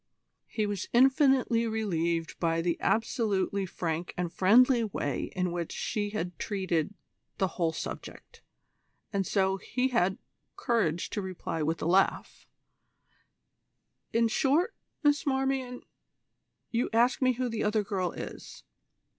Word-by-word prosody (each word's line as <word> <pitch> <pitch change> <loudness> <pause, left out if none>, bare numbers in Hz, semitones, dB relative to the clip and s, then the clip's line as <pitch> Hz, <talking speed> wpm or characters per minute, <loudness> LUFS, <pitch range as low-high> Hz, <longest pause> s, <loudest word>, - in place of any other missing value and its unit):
He 215 - -1
was 205 -2 -3
infinitely 260 -2 +4
relieved 170 -7 -1
by 165 -1 +1
the 170 -1 +1
absolutely 205 -4 0
frank 170 0 -3
and 175 -1 -2
friendly 235 +7 +5
way 145 - -2
in 180 -1 0
which 170 -1 -3
she 205 -1 -2
had 180 -4 -4
treated 190 -2 -1 0.4
the 190 - +1
whole 170 -3 0
subject, 160 - -8 0.7
and 195 -2 0
so 190 -1 +1
he 250 +6 -1
had 195 -5 +1 0.4
courage 180 -9 0
to 205 - -2
reply 185 -3 -4
with 160 +2 -1
a - - -1
laugh: 185 +3 +1 1.6
"In 230 0 +3
short, 290 - +2 0.3
Miss 290 0 +3
Marmion, 265 -2 -1 0.9
you 235 +1 0
ask 235 +4 +3
me 255 -1 +4
who 250 +1 -2
the 225 -2 -2
other 210 0 +1
girl 185 -3 -2
is. - - -9
205 Hz, 130 wpm, -29 LUFS, 180-240 Hz, 1.6 s, friendly